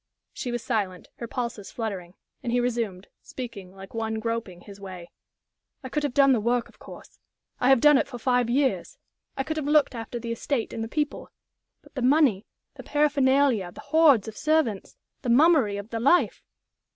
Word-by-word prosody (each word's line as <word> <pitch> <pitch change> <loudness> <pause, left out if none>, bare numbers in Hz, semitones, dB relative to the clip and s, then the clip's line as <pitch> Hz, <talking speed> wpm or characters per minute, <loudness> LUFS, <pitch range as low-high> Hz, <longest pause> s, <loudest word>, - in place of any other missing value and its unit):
She 245 - -4
was 240 -1 -3
silent, 200 -7 -2
her 235 - -6
pulses 235 -5 -5
fluttering, 195 -6 -5 0.3
and 240 - -3
he 245 - +2
resumed, 230 -6 -2 0.2
speaking 230 -8 -8
like 195 0 -12
one 225 -1 -2
groping 220 -5 -4
his 200 0 -13
way: 185 -3 -9 0.7
"I 260 - -6
could 300 - -1
have 290 -4 -3
done 275 -1 +6
the 240 - +2
work, 235 +2 0
of - - -22
course - - -13 0.4
I 250 - +2
have 270 -2 +6
done 295 +1 +6
it - - -1
for 245 - -8
five 245 0 +1
years. 265 +2 0 0.4
I 270 - 0
could 315 +3 -4
have 295 -2 -2
looked 300 -2 +3
after 230 0 -6
the 230 0 -5
estate 230 +1 -2
and 225 - -3
the - - -4
people. 295 +4 -3 0.5
But - - -20
the 265 - -4
money, 255 -6 +3 0.3
the - - -10
paraphernalia, 275 -8 +2
the - - -13
hordes 290 -7 +4
of 220 - -7
servants, 305 -10 0 0.2
the 250 - -3
mummery 265 -5 +4
of 205 +2 -8
the 230 - -2
life! 280 +9 +3
240 Hz, 190 wpm, -26 LUFS, 220-275 Hz, 0.7 s, done